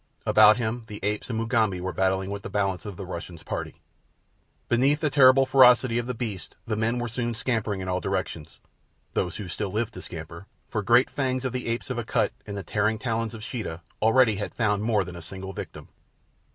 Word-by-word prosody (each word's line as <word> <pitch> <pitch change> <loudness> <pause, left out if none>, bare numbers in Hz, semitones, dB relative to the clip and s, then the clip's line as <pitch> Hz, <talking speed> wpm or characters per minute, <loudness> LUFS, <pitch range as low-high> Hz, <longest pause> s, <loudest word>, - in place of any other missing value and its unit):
About 110 +1 +7
him 115 0 -2
the 105 -1 -7
apes 105 +3 -2
and 115 - -2
Mugambi 115 -5 +1
were 95 +1 -3
battling 95 0 0
with 100 0 -4
the - - -7
balance 100 -1 -1
of 100 -4 -7
the 95 - -6
Russian's 85 -2 -7
party. - - -5 0.9
Beneath 135 +5 +3
the 155 -2 0
terrible 135 -1 +6
ferocity 125 -2 +5
of 120 - -4
the 125 - -3
beasts 105 -7 -5
the 110 - -1
men 110 +3 0
were 120 0 -2
soon 120 0 -2
scampering 105 -3 -1
in 95 - -5
all 90 0 0
directions—those 90 -2 -5
who 105 -2 -6
still 100 +3 -3
lived 110 +2 -2
to 90 - -8
scamper, 85 +2 -9 0.2
for 105 - -2
the - - -11
great 120 +2 +5
fangs 130 -2 -1
of 130 - -2
the 125 -1 -3
apes 115 +3 -2
of 125 - -2
Akut 115 - 0 0.2
and 100 -1 -5
the 100 - -4
tearing 105 +5 0
talons 115 -1 -2
of 110 - -9
Sheeta 105 -9 -5 0.2
already 115 -1 +4
had 100 - -5
found 105 -3 +1
more 110 -2 +2
than 90 -1 -9
a 85 - -8
single 95 +3 -7
victim. - - -8
110 Hz, 210 wpm, -26 LUFS, 95-120 Hz, 0.9 s, About